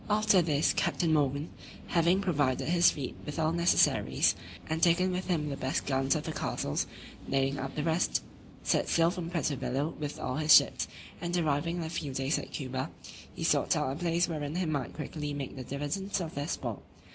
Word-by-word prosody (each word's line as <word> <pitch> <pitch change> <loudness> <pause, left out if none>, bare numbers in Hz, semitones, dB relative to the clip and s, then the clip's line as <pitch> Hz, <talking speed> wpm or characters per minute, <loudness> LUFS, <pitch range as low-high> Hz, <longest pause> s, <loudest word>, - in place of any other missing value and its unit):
After 210 -2 +4
this, 155 -2 +2
Captain 165 -2 +1
Morgan 145 +1 +1 0.4
(having 175 +3 +3
provided 145 -9 +1
his 175 0 +6
fleet 135 -4 -4
with 150 - -6
all 160 -1 +2
necessaries, 170 +1 +3 0.3
and 160 +1 -2
taken 180 +2 +4
with 185 +1 -3
him 160 -5 0
the 140 - -3
best 130 0 -2
guns 135 -1 +1
of 155 - -2
the 160 - -4
castles, 70 - -2 0.4
nailing 135 0 +1
up 135 0 -5
the 150 - -1
rest) 165 +2 +1 0.4
set - - +1
sail 165 0 +4
from 175 -2 -5
Puerto 165 -4 0
Bello 135 +4 -1
with 150 -1 -4
all 130 - -2
his 155 -1 +7
ships, - - +4 0.3
and 175 0 -1
arriving 165 +1 0
in 170 - -2
a 160 - -4
few 145 -5 -4
days 135 +3 +1
at - - -8
Cuba, 130 -2 -3 0.4
he - - -7
sought - - +3
out 130 - 0
a - - -3
place 170 +1 +1
wherein 150 -2 -4
he 180 0 0
might 150 -4 -2
quickly 150 -1 -5
make 140 -3 -5
the 130 - -6
dividend 145 +10 -3
of 165 -3 -4
their 145 +1 -3
spoil. - - -3
155 Hz, 200 wpm, -30 LUFS, 140-170 Hz, 0.4 s, his